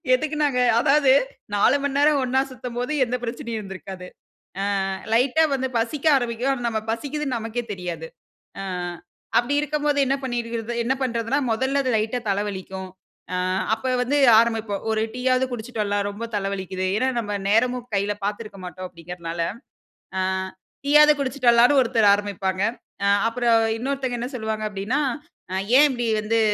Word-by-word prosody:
எதுக்கு 310 +3 -3
நாங்க 265 -4 +1 0.2
அதாவது 275 +1 +4 0.4
4 245 +7 +4
மணி 285 -1 -1
நேரம் 290 0 +4
ஒண்ணா 260 +1 +2
சுத்தும்போது 250 +2 -5
எந்த 250 +1 -2
பிரச்சனையும் 235 -1 -4
இருந்திருக்காது 190 -2 -8 0.8
அ. - - -2 0.2
லைட்டா 260 +7 +4
வந்து 265 0 -1
பசிக்க 275 +6 -2
ஆரம்பிக்கும். 245 +1 -1
ஆனா 245 -3 -2
நம்ம 220 -1 -1
பசிக்கிதுன்னு 285 +2 -2
நமக்கே 230 +2 -4
தெரியாது. 175 -4 -5 0.5
அ - - -5 0.8
அப்டி 240 +4 -1
இருக்கும்போது 295 -1 0
என்ன 270 +1 +1
பண்ணிறது 235 -2 -3
என்ன 255 +3 +1
பண்றதுன்னா 235 +1 0
மொதல்ல 265 +5 +1
அது 255 - 0
லைட்டா 220 +3 -1
தலை 200 +1 +1
வலிக்கும்.அ 190 -1 -8 0.4
அப்ப 225 - -3 0.2
வந்து 285 +4 0 0.2
ஆரம்பிப்போம். 225 -3 0
'ஒரு 220 0 +1
டீ 250 - -6
யாவது 255 0 +3
குடிச்சிட்டு 230 -1 -4
வரலாம், 205 0 -1
ரொம்ப 205 +3 -7
தலை 195 -1 -1
வலிக்கிது.' 185 -1 -3
ஏன்னா 260 +4 +1
நம்ம 205 -2 -2
நேரமும் 245 +3 +2
கையில 200 +1 0
பார்த்திருக்க 210 -1 -5
மாட்டோம். 185 +1 -7
அப்டிங்கிறனால. 170 0 -7 0.8
அ. - - +1 0.6
"டீ 285 - 0
யாவது 300 0 +8
குடிச்சுட்டலாம்ன்னு" 255 0 +4
ஒருத்தர் 225 -4 +3
ஆரம்பிப்பாங்க. 195 -2 -2 0.4
அ - - +3 0.2
அப்புறம் 230 -1 +3 0.2
இன்னொருத்தங்க, 260 0 -2
என்ன 245 - -3
சொல்லுவாங்க 220 -2 -3
அப்டின்னா, 210 +8 -2 0.8
"ஏன் 295 - +8
இப்டி 240 -2 -2
வந்து 225 +2 +1
235 Hz, 150 wpm, -23 LUFS, 205-260 Hz, 0.8 s, யாவது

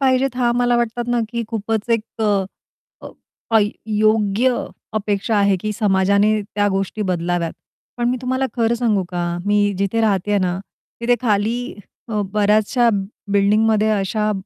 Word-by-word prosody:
पाहिजेत 260 -1 +2
हा 245 -2 +2
मला 245 0 +2
वाटतात 240 0 -1
ना, 240 0 +1
की 235 0 -2
खूपच 225 0 -2
एक 230 -2 +2 0.2
अ, 205 -2 +2 1.1
काह 225 - +6 0.4
योग्य 215 +3 +2 0.4
अपेक्षा 210 0 -1
आहे, 200 -1 +3
की 215 +4 -3
समाजाने 200 0 +2
त्या 205 0 -1
गोष्टी 195 +2 -2
बदलाव्यात. 175 -3 -1 0.4
पण 240 0 +1
मी 255 - 0
तुम्हाला 260 +1 0
खरं 235 -1 +2
सांगू 220 -5 +1
का, 175 -1 -2
मी 205 0 +2
जिथे 200 +4 0
राहतेय 205 -1 +1
ना 180 -1 -1 0.4
तिथे 245 +1 +3
खाली 220 +1 +1 0.5
अ, 210 -2 0
बऱ्याचशा 215 +3 +3 0.4
बिल्डिंगमध्ये 215 +2 +3
अशा 210 +1 0
215 Hz, 140 wpm, -20 LUFS, 200-235 Hz, 1.1 s, काह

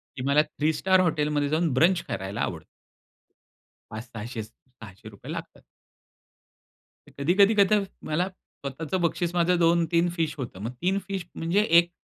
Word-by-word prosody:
की 130 - -6
मला 140 +2 +5
three 150 +1 -1
star 190 +2 +3
हॉटेलमध्ये 150 -4 +1
जाऊन 160 -2 +1
ब्रंच 170 +6 +3
करायला 95 +1 -4
आवडतं. - - -3 1.3
पाच 110 +1 -5
600 115 +1 -6
च 105 - -12 0.3
₹600 100 -5 -11
लागतात. - - -8 1.5
कधी-कधी 190 +9 +3
कध 200 +1 +5 0.3
मला 170 +4 0
स्वतःचं 160 -1 -6
बक्षीस 170 0 0
माझं 175 +1 +3
2-3 170 0 +3
फिश 160 -3 -1
होतं. 120 -8 -6
मग 115 +4 -4
3 190 +3 +1
फिश 195 -3 -4
म्हणजे 170 +5 +1
1 170 +1 +5
165 Hz, 140 wpm, -26 LUFS, 140-175 Hz, 1.5 s, मला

